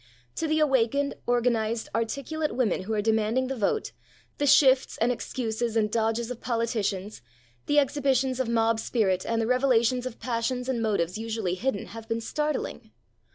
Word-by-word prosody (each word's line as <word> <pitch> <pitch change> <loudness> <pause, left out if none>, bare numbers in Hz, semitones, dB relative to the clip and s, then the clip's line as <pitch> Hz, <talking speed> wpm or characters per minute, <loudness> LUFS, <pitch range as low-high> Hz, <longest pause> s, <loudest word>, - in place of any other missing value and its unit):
To 325 - -1
the 310 0 +1
awakened, 280 -1 +2
organised, 235 -2 +1
articulate 280 +7 -2
women 240 -9 +1
who 220 - -2
are 210 - 0
demanding 220 +4 +1
the 270 - -2
vote, 250 - -1 0.5
the 290 - +1
shifts 265 -1 +5
and 235 +2 +2
excuses 230 -1 -2
and 210 -1 +1
dodges 225 +1 0
of 245 - -7
politicians, 220 -4 -2 0.5
the 290 - +2
exhibitions 270 -2 +2
of 255 -3 0
mob 225 -1 +2
spirit 195 -6 0
and 230 0 0
the 225 - +1
revelations 250 0 +2
of 240 - -9
passions 250 +1 -2
and 255 -3 -1
motives 200 -3 0
usually 220 -5 -2
hidden 210 +2 -2
have 225 +1 -10
been 225 0 -1
startling. 300 +6 -3
230 Hz, 160 wpm, -27 LUFS, 220-260 Hz, 0.5 s, shifts